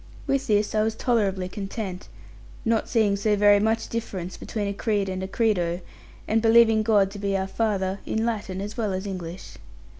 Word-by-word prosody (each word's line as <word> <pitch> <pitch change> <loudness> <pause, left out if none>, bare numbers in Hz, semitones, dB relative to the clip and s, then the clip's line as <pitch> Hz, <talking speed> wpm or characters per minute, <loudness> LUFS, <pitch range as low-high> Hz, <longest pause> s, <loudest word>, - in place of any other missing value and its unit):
With 275 -1 0
this 210 -1 +2
I 215 - +2
was 220 0 0
tolerably 200 -7 0
content, 195 -1 -5 0.6
not 225 -1 +1
seeing 215 -4 +3
so 210 +1 +1
very 205 0 +5
much 225 +2 0
difference 190 -6 -4
between 210 -2 -4
a 200 - -2
creed 205 -1 0
and 185 0 -3
a 190 - -3
credo, 185 -5 0 0.5
and 225 +1 +2
believing 225 -1 +5
God 205 -3 +3
to 205 - -8
be 200 -1 0
our 190 - -1
Father, 195 -2 -1
in 220 +1 -1
Latin 205 -5 -3
as 210 +2 -5
well 215 -5 -1
as 190 +2 -3
English. 180 -2 -7
205 Hz, 185 wpm, -25 LUFS, 190-225 Hz, 0.6 s, very